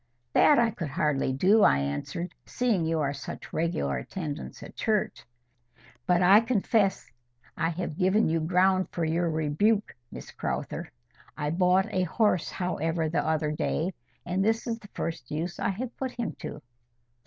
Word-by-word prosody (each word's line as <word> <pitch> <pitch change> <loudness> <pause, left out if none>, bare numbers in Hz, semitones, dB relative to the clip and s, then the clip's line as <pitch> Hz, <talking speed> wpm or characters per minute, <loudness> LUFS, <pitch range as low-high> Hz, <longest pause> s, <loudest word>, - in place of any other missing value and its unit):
"That 295 - +6
I 235 -1 +3
could 170 -6 -5
hardly 140 -1 0
do," 190 +11 +4
I 70 - +6
answered, 70 - -3
"seeing 215 -10 0
you 160 -1 0
are 140 -1 0
such 140 - -8
regular 115 - 0
attendants 150 - -6
at - - -11
church. 215 -1 -1 0.8
But 180 0 +4
I 195 +4 +8
confess 220 -3 +1 0.4
I 165 - 0
have 170 -1 -4
given 190 +4 +3
you 165 +1 +1
ground 185 +3 +2
for 170 - -1
your 165 +2 +1
rebuke, 160 +8 +1 0.2
Miss - - -9
Crowther. - - -4 0.5
I 150 0 -1
bought 180 +2 +3
a 185 - +2
horse, 185 0 +1
however, 165 -3 -1
the 155 -2 0
other 155 -1 0
day, 160 +4 -1 0.3
and 180 +2 0
this 225 +2 +1
is 230 -1 -3
the 205 - -14
first 160 -7 -4
use 165 +4 -3
I - - 0
have 230 +6 -4
put 260 -2 -3
him 235 -2 -3
to." 150 - -7
175 Hz, 165 wpm, -28 LUFS, 155-200 Hz, 0.8 s, I